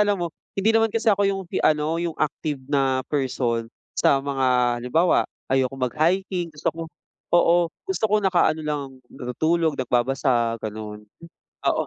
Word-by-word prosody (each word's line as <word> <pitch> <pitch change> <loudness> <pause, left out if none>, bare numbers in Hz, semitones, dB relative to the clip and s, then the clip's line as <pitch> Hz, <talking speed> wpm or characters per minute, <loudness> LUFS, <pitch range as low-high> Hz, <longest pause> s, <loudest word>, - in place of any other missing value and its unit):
alam 205 -1 +3
mo 165 - -5 0.2
hindi 210 +3 +3
naman 225 0 +4
kasi 230 +2 -2
ako 200 - +1
yung 195 -1 -2
fi - - -2
ano, 155 +2 +2
yung 170 -2 -3
active 150 -1 -2
na 135 -2 +1
person 120 -4 -1 0.2
sa 140 - +3
mga 125 -3 +1
halimbawa, 160 +9 +2 0.2
ayokong 135 0 +1
mag-hiking 175 +2 0
gusto 150 -1 -3
ko 165 - -8 0.5
oo, 175 0 +4 0.2
gusto 380 - -2
ko 215 - +4
nakaano 180 -5 +2
lang, 145 -4 -4
natutulog, 155 +5 -1
nagbabasa, 120 -2 +1
gano'n. 105 -1 -7 0.6
Oo, - - +1
150 Hz, 145 wpm, -23 LUFS, 130-170 Hz, 0.6 s, naman